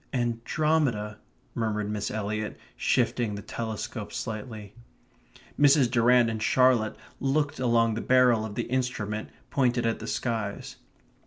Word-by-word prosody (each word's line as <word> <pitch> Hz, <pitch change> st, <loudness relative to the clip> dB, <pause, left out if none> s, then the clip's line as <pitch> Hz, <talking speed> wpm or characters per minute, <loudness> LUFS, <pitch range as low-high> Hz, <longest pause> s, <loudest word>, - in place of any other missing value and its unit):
"Andromeda," 120 Hz, -2 st, 0 dB, 0.3 s
murmured 105 Hz, -2 st, -1 dB
Miss 105 Hz, -1 st, -2 dB
Eliot, 110 Hz, 0 st, -3 dB, 0.2 s
shifting 115 Hz, -3 st, +1 dB
the 100 Hz, -, -7 dB
telescope 110 Hz, 0 st, -5 dB
slightly. 110 Hz, -2 st, -6 dB, 0.9 s
Mrs. 140 Hz, -4 st, +5 dB
Durrant 120 Hz, 0 st, +5 dB
and 110 Hz, -1 st, -3 dB
Charlotte 125 Hz, -2 st, +3 dB, 0.2 s
looked 145 Hz, +2 st, 0 dB
along 115 Hz, -2 st, +3 dB
the 110 Hz, -, -3 dB
barrel 125 Hz, -3 st, +4 dB
of 110 Hz, -2 st, -6 dB
the -, -, -1 dB
instrument 120 Hz, -4 st, -2 dB, 0.2 s
pointed 125 Hz, -3 st, +1 dB
at 115 Hz, -, 0 dB
the -, -, -7 dB
skies. 110 Hz, -4 st, -3 dB
115 Hz, 125 wpm, -27 LUFS, 110-125 Hz, 0.9 s, Mrs